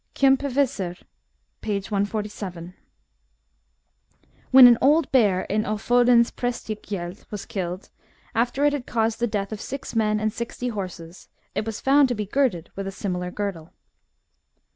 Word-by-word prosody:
Kjampeviter, 270 -9 +1 0.6
p. 215 - -2
147. 200 -3 -4 1.8
When 260 -1 +9
an 240 -2 +7
old 300 +2 +3
bear 205 -8 +3
in 215 +2 -1
Ofodens 235 +3 +3
PrSBstegjeld 210 -6 -5
was 210 -2 -6
killed, 185 0 -5 0.4
after 245 +5 +1
it 290 - +3
had 280 -4 -4
caused 225 -1 0
the 240 - +1
death 205 -2 -3
of 215 - -5
six 275 -2 -6
men 215 -1 +2
and 215 0 -1
sixty 235 +1 -4
horses, 185 -5 -7 0.2
it 215 - -3
was 225 - -4
found 275 +1 +5
to 245 - -1
be 210 -1 -3
girded 210 - 0
with 195 0 -4
a - - -3
similar 180 -2 -3
girdle. 180 -4 -5
215 Hz, 140 wpm, -24 LUFS, 195-245 Hz, 1.8 s, When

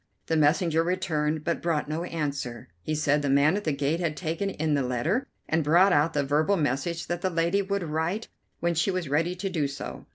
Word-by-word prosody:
The 165 - 0
messenger 160 +2 +3
returned, 160 -4 -1
but 170 +2 -1
brought 165 -4 0
no 155 +3 -2
answer. 140 - -4
He 155 - -2
said 150 -1 +2
the 145 - -1
man 140 +5 +4
at 205 - -3
the 155 - +1
gate 145 +3 0
had 165 -3 -2
taken 165 +3 -2
in 160 -4 -1
the 140 - +2
letter, 130 - 0 0.2
and 160 0 +1
brought 175 +6 +5
out 150 +3 +3
the 145 - +1
verbal 155 +8 +2
message 155 +3 -1
that 175 0 -3
the 185 - +1
lady 170 +3 +1
would 200 -1 -2
write 165 +7 -2 0.3
when 170 0 +1
she 160 +3 +1
was 185 -4 -1
ready 165 +5 +1
to 190 +2 -3
do 160 -7 0
so. 140 - -7
160 Hz, 220 wpm, -27 LUFS, 145-175 Hz, 0.3 s, brought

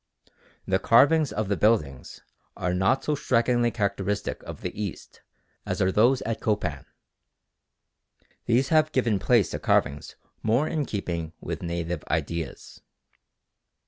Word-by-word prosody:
The 95 0 +1
carvings 145 +8 +4
of 110 -1 -2
the 100 - 0
buildings 85 - 0 0.3
are 90 0 -1
not 95 +9 +2
so 150 - 0
strikingly 120 -3 +2
characteristic 100 -2 -2
of - - -9
the - - -4
East 100 -5 -7 0.4
as - - -3
are 95 0 +2
those 120 +6 +3
at 115 0 -3
Copan. 90 -10 -2 1.6
These 125 +3 +2
have 155 -1 +3
given 115 -6 +1
place 115 -1 +3
to - - -4
carvings 70 +1 0 0.3
more 120 +7 +2
in 150 -3 -2
keeping 85 -5 -4
with - - -5
native 85 -1 -3
ideas. 85 -1 -4
105 Hz, 130 wpm, -26 LUFS, 90-120 Hz, 1.6 s, carvings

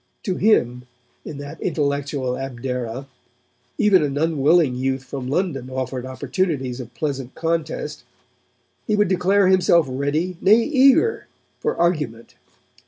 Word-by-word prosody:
To 185 -4 -2
him, 125 - +2 0.4
in 150 - -8
that 145 0 -9
intellectual 140 -5 -1
Abdera, 125 -1 -4 0.7
even 200 -4 +4
an 145 -2 -1
unwilling 155 -1 +3
youth 130 +1 -2
from 130 -1 -6
London 140 -4 -2
offered 130 -1 -4
opportunities 135 -1 -2
of 125 -1 -9
pleasant 135 -2 -4
contest. 165 -1 -3 0.8
He 215 - +2
would 210 -2 +2
declare 190 +1 +3
himself 180 -3 +4
ready, 145 +7 -2
nay 215 +4 +5
eager, 280 - +3 0.3
for - - -2
argument. 150 -10 -1
145 Hz, 120 wpm, -22 LUFS, 130-180 Hz, 0.8 s, nay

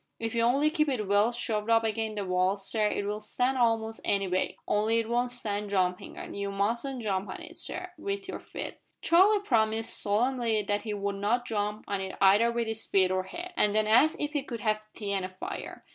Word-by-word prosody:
If 225 -1 -3
you 230 - +1
only 275 +6 +3
keep 305 -2 +1
it 225 -7 -1
well 205 +3 +3
shoved 220 -2 -2
up 225 0 +5
agin 220 0 -1
the 205 -2 -3
wall, 185 +2 +1
sir, 210 +2 +1
it'll 210 +1 -2
stand 250 +5 0
a'most 225 -2 +1
any 195 -1 +1
weight 185 +1 -1
only 215 +2 +2
it 230 -1 0
won't 240 +1 +1
stand 210 -4 -2
jumpin' 180 -2 -1
on. - - -7
You 200 0 -3
mustn't 235 +6 -1
jump 195 -2 -1
on - - -6
it, 335 0 -11
sir, 365 0 -5
with 395 -1 -4
your 380 - -5
feet!" - - -7 0.2
Charlie 390 +5 +5
promised 225 - +1
solemnly 225 +1 +1
that 205 +1 -1
he 215 -2 -4
would 200 0 -2
not 230 +5 0
jump 210 -2 -2
on 200 -1 -2
it 190 0 -5
either 205 +5 +5
with 235 0 -1
his 225 0 -4
feet 190 -1 +2
or 185 0 0
head, 350 - -7
and 210 -7 +2
then 215 0 +3
asked 250 +9 +5
if 295 0 -2
he 290 - +1
could 235 -5 -6
have 215 0 0
tea 205 -2 -4
and 195 -1 -1
a 185 - -4
fire. 185 0 -7
220 Hz, 220 wpm, -29 LUFS, 200-245 Hz, 0.2 s, up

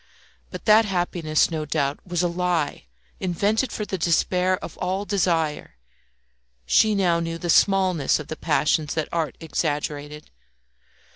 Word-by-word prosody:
But - - -9
that 220 +1 +6
happiness, 175 -5 0
no 155 -1 -2
doubt, 145 -1 -1
was 175 0 -1
a - - +3
lie 175 - -1 0.3
invented 205 +7 0
for 210 - -4
the 190 -2 -4
despair 180 +3 +1
of - - -9
all 190 +2 -2
desire. 165 - -1 0.9
She 215 - +4
now 175 -4 +2
knew 165 0 -3
the 170 0 -1
smallness 185 -7 +3
of 150 - -8
the 155 - -5
passions 150 -1 0
that 155 -2 -2
art 160 -5 -2
exaggerated. 150 -2 -3
170 Hz, 140 wpm, -23 LUFS, 155-185 Hz, 0.9 s, that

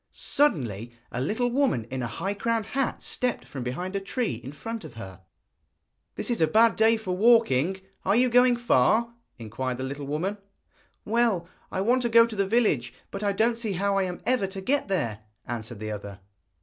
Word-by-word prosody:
Suddenly 120 - 0 0.2
a 125 - -3
little 220 - 0
woman 250 - +1
in 130 0 -3
a 120 - -2
high 195 +12 -3
crowned 225 +1 -1
hat 265 +3 -2
stepped 250 -1 -2
from 135 - -7
behind 175 +11 -4
a - - +1
tree 215 - -2
in 135 - -7
front 225 +10 -6
of 120 - -11
her. 95 -5 -9 0.9
'This - - -3
is 235 - -1
a 160 - +5
bad 225 +7 +4
day 225 +1 +4
for 185 -5 -3
walking! 190 - +4 0.2
Are - - +2
you 250 +2 +4
going 245 0 +5
far?' 235 - +2 0.2
inquired 125 +2 -4
the 130 - -4
little 140 +1 -5
woman. 180 +8 -2 0.7
'Well, 220 -6 +1 0.2
I 190 - -1
want 245 +5 +2
to 240 - 0
go 230 0 +7
to 230 -2 -6
the 200 -1 0
village; 150 - +1 0.2
but 200 - -5
I 205 -1 +1
don't 230 +3 +1
see 220 -4 -2
how 200 +2 0
I - - +2
am 180 -1 -4
ever 245 -5 +2
to 195 0 -6
get 275 +8 0
there,' 145 - -1 0.3
answered 115 -2 -5
the 110 0 -4
other. 100 -2 -7
195 Hz, 200 wpm, -26 LUFS, -, 0.9 s, go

